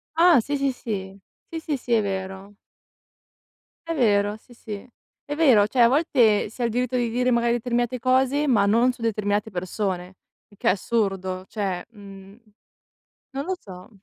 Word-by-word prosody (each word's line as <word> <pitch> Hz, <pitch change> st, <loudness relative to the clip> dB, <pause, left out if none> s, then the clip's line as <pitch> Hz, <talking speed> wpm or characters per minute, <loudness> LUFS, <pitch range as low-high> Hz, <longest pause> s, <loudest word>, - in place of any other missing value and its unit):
Ah, 335 Hz, -3 st, +6 dB
sì, 285 Hz, +5 st, -2 dB
sì, 275 Hz, -1 st, +1 dB
sì. 200 Hz, -5 st, -6 dB, 0.3 s
Sì, 330 Hz, -, -5 dB
sì, 310 Hz, -3 st, -3 dB
sì, 245 Hz, -, -9 dB
è 225 Hz, -, +4 dB
vero. 190 Hz, 0 st, -5 dB, 1.3 s
È 330 Hz, -, -1 dB
vero, 210 Hz, -6 st, +2 dB
sì, 245 Hz, -, -19 dB
sì, 215 Hz, -1 st, -8 dB, 0.4 s
è 290 Hz, -, -4 dB
vero, 255 Hz, -10 st, +5 dB
cioè 245 Hz, +3 st, +1 dB
a 235 Hz, -, +8 dB
volte 245 Hz, -8 st, +3 dB
si 245 Hz, -, -9 dB
ha -, -, +1 dB
il 230 Hz, -, 0 dB
diritto 250 Hz, +1 st, -1 dB
di 240 Hz, -2 st, +1 dB
dire 250 Hz, +2 st, +1 dB
magari 235 Hz, 0 st, +2 dB
determinate 240 Hz, +1 st, -1 dB
cose, 265 Hz, +4 st, +2 dB
ma 215 Hz, -6 st, +4 dB
non 235 Hz, +5 st, +3 dB
su 245 Hz, -, -15 dB
determinate 210 Hz, -1 st, -1 dB
persone, 185 Hz, 0 st, -3 dB, 0.3 s
il 205 Hz, -, -21 dB
che -, -, +1 dB
è -, -, +6 dB
assurdo 195 Hz, -3 st, -1 dB
cioè 195 Hz, -4 st, -3 dB
mhmm, 200 Hz, -1 st, -13 dB, 0.9 s
non 275 Hz, +1 st, -4 dB
lo 375 Hz, +1 st, -1 dB
so. 185 Hz, -2 st, -12 dB
225 Hz, 175 wpm, -24 LUFS, 200-255 Hz, 1.3 s, a